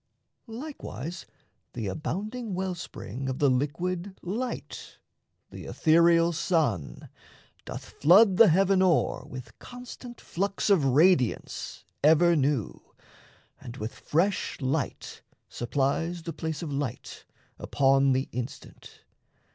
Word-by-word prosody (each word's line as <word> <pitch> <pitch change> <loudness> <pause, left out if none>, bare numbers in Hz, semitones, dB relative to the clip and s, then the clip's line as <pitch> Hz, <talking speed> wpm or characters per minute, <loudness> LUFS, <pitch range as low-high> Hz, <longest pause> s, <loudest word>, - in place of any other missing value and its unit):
Likewise, 225 - -7 0.5
The 115 -3 -4
abounding 200 - -4
well 190 0 -2
spring 135 - -6
of 130 - -3
the 140 -2 +3
liquid 175 +8 -2
light, 235 +8 -5 0.5
The - - -9
ethereal 170 +1 +4
sun, 140 - -1 0.6
doth - - -7
flood 185 +5 +5
the 230 - +8
heaven 190 +2 +3
o'er 180 -4 +1
With 125 -1 -10
constant 245 -1 -10
flux 200 +3 -2
of 185 -7 +4
radiance 140 -1 +1 0.2
ever 165 +3 +5
new, 140 -6 -2 0.6
And 120 0 -9
with 110 +2 -5
fresh 180 +6 -1
light 130 -1 -3 0.3
supplies 145 +7 -1
the 165 - -5
place 160 0 -4
of 150 -4 -4
light, 140 -4 -5 0.4
Upon 135 0 +3
the 130 +1 0
instant. 125 +2 -8
165 Hz, 110 wpm, -27 LUFS, 135-190 Hz, 0.6 s, the